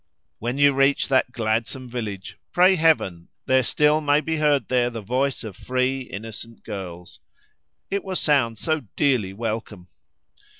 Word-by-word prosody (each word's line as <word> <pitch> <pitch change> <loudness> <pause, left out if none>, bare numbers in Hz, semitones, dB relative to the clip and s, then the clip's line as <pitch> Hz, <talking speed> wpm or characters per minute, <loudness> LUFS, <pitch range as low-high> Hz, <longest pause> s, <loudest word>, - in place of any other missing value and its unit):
When 120 +4 -3
you 145 0 +5
reach 135 +1 +2
that 130 -2 +2
gladsome 115 +2 -2
village, 110 -6 -6 0.2
pray 180 +2 +5
Heaven 155 - +2 0.2
there 130 0 +4
still 150 +5 +2
may 145 0 +3
be 160 +1 -2
heard 150 -2 +2
there 125 -1 +2
the 115 -2 -6
voice 130 +6 -1
of 105 -4 -7
free, 130 +3 -1
innocent 115 0 -9
girls. 90 -4 -8 0.7
It 200 0 -1
will 190 -1 -4
sound 135 -9 +2
so 155 +9 0 0.2
dearly 125 -10 +1
welcome! 110 -3 -5
125 Hz, 145 wpm, -23 LUFS, 110-145 Hz, 0.7 s, you